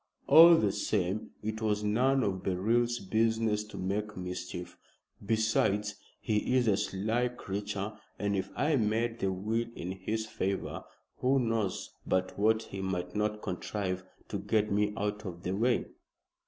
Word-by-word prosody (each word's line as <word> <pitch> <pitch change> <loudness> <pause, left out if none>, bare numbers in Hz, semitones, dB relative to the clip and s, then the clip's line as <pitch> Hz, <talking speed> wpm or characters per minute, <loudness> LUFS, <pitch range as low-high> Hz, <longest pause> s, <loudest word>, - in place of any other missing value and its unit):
All 170 +1 +9
the 105 -10 +2
same 105 -1 -1
it 110 +1 -3
was 105 -1 0
none 130 +6 +3
of 95 -3 -1
Beryl's 115 +6 +1
business 110 +1 +1
to 105 - -10
make 105 +2 -2
mischief. 90 -1 -5 0.5
Besides, 105 -1 +1 0.3
he 110 +3 0
is 125 -2 +2
a 105 - +5
sly 105 +4 0
creature, 105 -3 -4 0.2
and 100 -1 0
if 95 - -2
I 150 0 +2
made 115 +1 0
the 95 - +1
will 110 +5 -1
in 90 - -4
his 105 +4 -3
favor, 95 -3 -3 0.3
who 130 +2 +2
knows 115 -6 -1
but 95 0 0
what 110 +2 +3
he 95 - -7
might 90 -1 -3
not 105 0 -1
contrive 95 -1 -3 0.3
to - - -2
get 105 -1 +1
me 105 +1 +2
out 105 +1 -2
of 90 -3 -7
the 90 - -2
way?" 120 +4 +2
105 Hz, 155 wpm, -31 LUFS, 95-110 Hz, 0.5 s, All